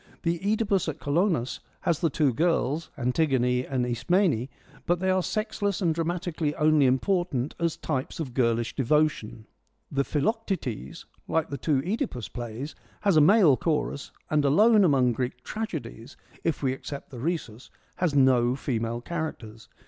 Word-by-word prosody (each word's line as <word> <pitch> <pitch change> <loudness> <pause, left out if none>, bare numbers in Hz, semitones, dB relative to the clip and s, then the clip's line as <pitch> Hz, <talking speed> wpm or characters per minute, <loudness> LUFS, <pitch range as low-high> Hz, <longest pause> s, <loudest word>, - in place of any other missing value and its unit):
The 170 0 0
CEdipus 200 -2 +1
at 155 - -5
Colonus 155 - 0 0.2
has 170 -5 +1
the 165 - +2
two 145 -3 +1
girls, 160 0 0
Antigone 125 -2 +1
and 130 -2 0
Ismene, 135 - +1 0.4
but 175 0 +2
they 190 +1 +1
are 185 0 +2
sexless 205 0 -2
and 170 -4 +2
dramatically 165 -2 -2
only 150 -2 +4
important 145 -1 0
as 170 -1 0
types 135 -1 -3
of 135 -6 -4
girlish 115 -2 +1
devotion. 135 -5 0 0.5
The 140 -1 +1
Philoc 220 - -1
tetes, 120 - -4 0.2
like 160 -2 0
the 140 - -3
two 140 -2 +1
CEdipus 195 - -3
plays, 120 +4 -5 0.3
has 200 -4 +3
a 155 - +7
male 170 -3 +6
chorus 150 -1 -2 0.2
and 150 -1 +3
alone 210 +10 +5
among 135 -7 +4
Greek 125 +1 -4
tragedies, 160 - -6 0.3
if 165 -3 -1
we 130 -1 +2
except 140 +1 -8
the 125 - -8
Rhesus, 130 -6 -4 0.3
has 170 -5 0
no 130 -2 +4
female 120 -3 -2
characters. 125 -8 -6
150 Hz, 150 wpm, -27 LUFS, 125-175 Hz, 0.5 s, a